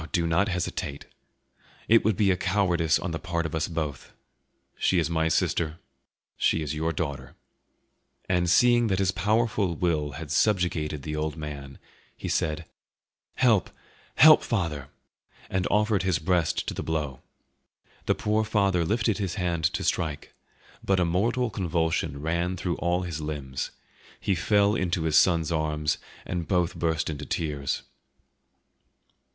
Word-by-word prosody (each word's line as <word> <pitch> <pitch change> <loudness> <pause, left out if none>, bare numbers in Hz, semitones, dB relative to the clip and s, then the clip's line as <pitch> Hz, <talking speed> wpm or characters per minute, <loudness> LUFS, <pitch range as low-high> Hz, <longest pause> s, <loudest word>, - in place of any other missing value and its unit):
Oh, - - -8
do 85 -2 +1
not 85 +5 +2
hesitate! 90 -5 -3 0.8
It 115 +1 +5
would 110 -4 +1
be 100 -2 +3
a - - +3
cowardice 90 -4 +2
on 85 +2 -4
the 80 - -3
part 85 -1 -2
of 80 - -3
both 80 0 -1
of 85 - -8
us; 75 -4 -3 0.6
she 95 - +1
is 85 -1 +1
my 80 -1 +1
sister, 80 0 0 0.6
she 80 - +2
is 75 -1 -3
your 80 +2 -1
daughter." 70 -5 -4 0.9
And 90 -2 +1
seeing 120 +5 +5
that 95 -3 +1
his 95 -1 +2
powerful 105 -2 +1
will 75 -4 0
had 75 +1 -7
subjugated 80 -6 +1
the 75 +1 -4
old 75 +1 -2
man, 70 -3 -7 0.4
he - - -6
said, 80 +1 -1 0.7
"Help! 115 -8 +3 0.5
help, 155 +2 +8
father!" 85 - -2 0.6
and 95 0 0
offered 105 -1 +2
his 95 -3 +1
breast 85 0 0
to - - -2
the - - -4
blow. 75 -5 -3 0.9
The - - +3
poor 105 +1 +1
father 100 -5 +1
lifted 110 +4 0
his 95 -4 -2
hand 85 -5 -1
to 85 - 0
strike; 75 -5 -2 0.5
but 95 -1 +2
a 90 - +3
mortal 115 +8 0
convulsion 80 -5 -1
ran 85 +3 -1
through 90 -1 -2
all 90 +1 0
his 85 -4 -4
limbs; 70 -3 -4 0.5
he 100 - 0
fell 100 +5 +3
into 90 -5 0
his 80 -1 +1
son's 85 -2 +4
arms, 75 -1 0 0.3
and 85 -2 -3
both 90 -3 +1
burst 80 -2 -1
into 75 -1 -4
tears. 70 -4 -2
85 Hz, 155 wpm, -26 LUFS, 80-95 Hz, 0.9 s, help